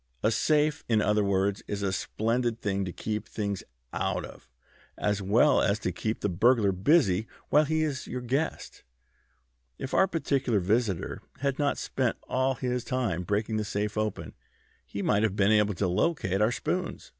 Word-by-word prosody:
A 110 - +3
safe, 150 +5 +2
in 110 -2 +4
other 105 0 +2
words, 100 0 +1
is 100 -1 -3
a 95 -1 0
splendid 115 +4 -1
thing 100 -2 -1
to 90 - -4
keep 105 +3 -4
things 100 -3 -3 0.3
out - - -1
of, - - -14 0.5
as 105 -1 0
well 110 +10 +4
as 100 +1 +2
to - - -2
keep 110 0 -3
the - - +1
burglar 105 +3 +3
busy 105 - +3 0.2
while 150 +2 +5
he 160 +1 +1
is 145 -4 -3
your 125 - -4
guest. 135 +6 -2 1.0
If 135 - -6
our 190 - +5
particular 135 - 0
visitor 100 0 0 0.2
had 140 0 -1
not 145 -1 +1
spent 130 -4 -1
all 130 +1 +1
his 125 -1 -2
time 115 -8 -1
breaking 105 +4 -1
the 110 - 0
safe 105 0 -2
open 110 -2 -3 0.5
he 100 - -4
might 105 0 +2
have 105 -3 +1
been 100 0 +3
able 105 -2 +3
to 95 +2 0
locate 95 - 0
our 110 +2 +4
spoons." - - -3
110 Hz, 175 wpm, -28 LUFS, 100-130 Hz, 1.0 s, while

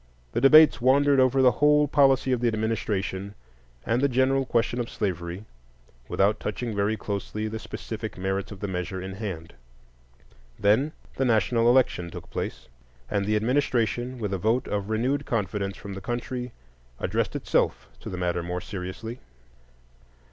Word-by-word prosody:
The - - -1
debates 135 -4 +7
wandered 140 +2 +4
over 130 +1 +4
the 125 - +7
whole 150 +5 +4
policy 135 -2 +3
of 125 -2 +1
the 120 - +2
administration 105 -3 -2 0.5
and 120 +3 +1
the 140 - +3
general 130 +1 +2
question 120 +1 0
of 120 - -2
slavery, 90 -1 -3 0.6
without 105 +2 +2
touching 110 +1 -3
very 100 +2 +1
closely 105 +1 -4
the 110 +1 -5
specific - - -6
merits 95 +1 -2
of 100 - -9
the 100 - -2
measure 95 0 -3
in 95 +1 -6
hand. 95 -5 -6 1.0
Then 120 +10 +2 0.2
the 135 - +1
national 115 0 +3
election 120 -9 +2
took - - -10
place; - - -5 0.4
and 100 -1 0
the 105 - +2
administration, 120 0 0
with 105 -4 -3
a 95 - -1
vote 115 +6 +1
of 100 0 -2
renewed 130 +6 0
confidence 100 -3 -2
from 100 - -8
the 95 - -7
country, 125 +2 -4 0.5
addressed - - -1
itself - - 0
to - - -8
the 90 - -5
matter 90 -1 -1
more 90 +1 -3
seriously. 95 +5 -6
110 Hz, 155 wpm, -26 LUFS, 95-125 Hz, 1.0 s, debates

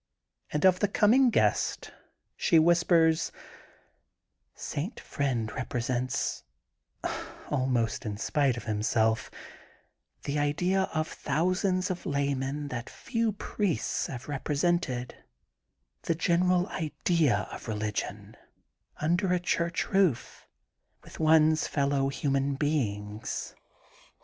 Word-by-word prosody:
And 150 +4 0
of 185 -1 +5
the 205 - +2
coming 235 +6 +4
guest, - - +1 0.4
she 170 - +3
whispers: 165 -1 +4 0.4
— - - -35 0.2
* - - -51 0.2
St. 175 - -4
Friend 125 -6 -2
represents, 130 0 -2 1.1
almost 130 -5 0
in 105 -3 -4
spite 135 +2 +1
of 120 - -6
himself, 110 +1 +1 0.9
the 145 +1 -1
idea 180 +6 +1
of 155 0 -1
thousands 185 +5 0
of 180 - -5
laymen, 140 0 -1
that 120 -2 -5
few 230 -3 -1
priests 200 -3 -1
have 125 -2 -7
represented: 145 -2 -1 0.4
— 60 0 -51
^the 165 - 0
general 180 +1 +2
idea 150 - 0
of - - -8
religion, 105 -1 -4 0.6
under 175 +5 +1
a 180 - +2
church 170 -1 -1
roof, 190 - +1 0.6
with - - -13
one's 155 0 +4
fellow 140 -1 +1
human 140 0 0
beings. 110 -8 -2
145 Hz, 105 wpm, -29 LUFS, 125-175 Hz, 1.1 s, of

